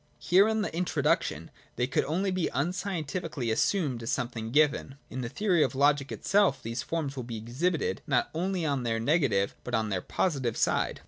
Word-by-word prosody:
Here 190 Hz, +4 st, +4 dB
in 220 Hz, -1 st, +1 dB
the 185 Hz, -, -4 dB
introduction 180 Hz, +1 st, 0 dB, 0.2 s
they 125 Hz, -, +1 dB
could 130 Hz, -, +1 dB
only 185 Hz, +6 st, 0 dB
be 185 Hz, -2 st, 0 dB
unscientifically 165 Hz, -, -2 dB
assumed 135 Hz, -, +1 dB
as 115 Hz, -, -4 dB
something 115 Hz, -2 st, -3 dB
given. 145 Hz, 0 st, +2 dB, 0.2 s
In 130 Hz, -, -4 dB
the 120 Hz, -, -3 dB
theory 185 Hz, -, +1 dB
of 140 Hz, -, +1 dB
logic 140 Hz, 0 st, +2 dB
itself 190 Hz, -10 st, +2 dB
these 115 Hz, +1 st, -3 dB
forms 155 Hz, -5 st, -3 dB
will 130 Hz, -, -3 dB
be 120 Hz, -2 st, -6 dB
exhibited, 130 Hz, -, -1 dB
not 130 Hz, -4 st, +1 dB
only 180 Hz, +1 st, -1 dB
on 140 Hz, -4 st, 0 dB
tjigir 115 Hz, -1 st, 0 dB
ne 155 Hz, +8 st, +3 dB
gative, 100 Hz, -10 st, +1 dB
but -, -, -2 dB
alspon 110 Hz, -1 st, 0 dB
their 95 Hz, -2 st, -1 dB
positive 135 Hz, -, -1 dB
side. -, -, +1 dB
140 Hz, 190 wpm, -29 LUFS, 120-175 Hz, 0.2 s, Here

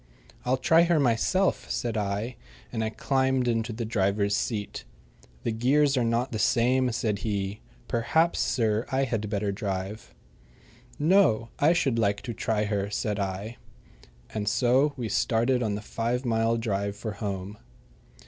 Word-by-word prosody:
"I'll 130 Hz, +1 st, +2 dB
try 160 Hz, +6 st, +4 dB
her 170 Hz, -2 st, +3 dB
myself," 140 Hz, +9 st, +1 dB
said 120 Hz, -2 st, -2 dB
I, 105 Hz, +3 st, -2 dB, 0.4 s
and 110 Hz, -2 st, -2 dB
I 110 Hz, -, 0 dB
climbed 130 Hz, +2 st, +1 dB
into 115 Hz, 0 st, 0 dB
the 115 Hz, +1 st, -4 dB
driver's 100 Hz, -1 st, +1 dB
seat. 105 Hz, -, -3 dB, 0.6 s
"The 115 Hz, -, 0 dB
gears 135 Hz, +5 st, +3 dB
are 125 Hz, -, +2 dB
not 115 Hz, +2 st, 0 dB
the 110 Hz, -, -3 dB
same," 125 Hz, +4 st, +3 dB
said 110 Hz, -3 st, -1 dB
he. 100 Hz, -1 st, -2 dB, 0.3 s
"Perhaps, 160 Hz, +9 st, +1 dB
sir, 110 Hz, -1 st, +1 dB
I 135 Hz, +1 st, +2 dB
had 115 Hz, -5 st, -2 dB
better 100 Hz, -1 st, -1 dB
drive." 100 Hz, +1 st, -5 dB, 0.8 s
"No; 150 Hz, -, +3 dB
I 155 Hz, +4 st, +5 dB
should 135 Hz, -9 st, +1 dB
like 100 Hz, -2 st, +1 dB
to 120 Hz, -2 st, -4 dB
try 110 Hz, -1 st, 0 dB
her," 100 Hz, -1 st, -1 dB
said 105 Hz, 0 st, -2 dB
I. 100 Hz, +4 st, -4 dB, 0.8 s
And 105 Hz, -1 st, -1 dB
so 130 Hz, +6 st, +3 dB
we 120 Hz, -3 st, -3 dB
started 120 Hz, +4 st, +1 dB
on 105 Hz, -3 st, 0 dB
the 105 Hz, -, -5 dB
five 120 Hz, +4 st, -2 dB
mile 115 Hz, 0 st, +1 dB
drive 100 Hz, -3 st, -2 dB
for 110 Hz, +1 st, -5 dB
home. 100 Hz, 0 st, -5 dB
115 Hz, 155 wpm, -27 LUFS, 105-125 Hz, 0.8 s, I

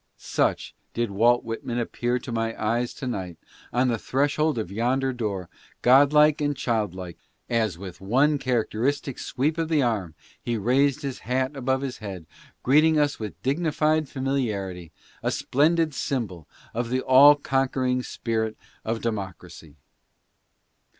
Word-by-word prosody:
Such -, -, -1 dB, 0.2 s
did 120 Hz, -3 st, -1 dB
Walt 120 Hz, +5 st, +3 dB
Whitman 115 Hz, +1 st, -4 dB
appear 120 Hz, +1 st, -1 dB
to 125 Hz, -, -7 dB
my 115 Hz, 0 st, -2 dB
eyes 120 Hz, +3 st, 0 dB
to 135 Hz, -, -6 dB
night, 95 Hz, -9 st, -4 dB, 0.3 s
at 125 Hz, +2 st, +2 dB
the 115 Hz, -3 st, 0 dB
threshold 145 Hz, +3 st, +1 dB
of 105 Hz, -5 st, -3 dB
yonder 130 Hz, +5 st, 0 dB
door, 100 Hz, -7 st, -3 dB, 0.4 s
godlike 145 Hz, +4 st, +5 dB
and 145 Hz, -1 st, 0 dB
childlike, 100 Hz, -9 st, -2 dB, 0.3 s
as 110 Hz, -7 st, +1 dB
with 90 Hz, -1 st, -9 dB
one 135 Hz, +9 st, +2 dB
characteristic 130 Hz, +2 st, -1 dB
sweep 155 Hz, +5 st, -1 dB
of 165 Hz, -1 st, -1 dB
the 155 Hz, -4 st, +3 dB
arm 100 Hz, -9 st, -1 dB, 0.3 s
he 120 Hz, -1 st, -2 dB
raised 135 Hz, +6 st, +2 dB
his 135 Hz, -2 st, -4 dB
hat 130 Hz, +3 st, -1 dB
above 130 Hz, 0 st, 0 dB
his 135 Hz, -2 st, -5 dB
head, 95 Hz, -6 st, -7 dB, 0.4 s
greeting 155 Hz, +4 st, +4 dB
us 145 Hz, -1 st, +1 dB
with 110 Hz, -2 st, -6 dB
dignified 155 Hz, +1 st, +1 dB
familiarity, 105 Hz, -, -2 dB, 0.3 s
a -, -, 0 dB
splendid 155 Hz, +3 st, +1 dB
symbol 105 Hz, -, -3 dB, 0.3 s
of 120 Hz, +1 st, -2 dB
the 130 Hz, +1 st, 0 dB
all 140 Hz, +3 st, +8 dB
conquering 130 Hz, -2 st, 0 dB
spirit 110 Hz, -3 st, -3 dB, 0.3 s
of 115 Hz, +1 st, -2 dB
democracy. 95 Hz, -8 st, -5 dB
125 Hz, 140 wpm, -25 LUFS, 110-140 Hz, 0.4 s, all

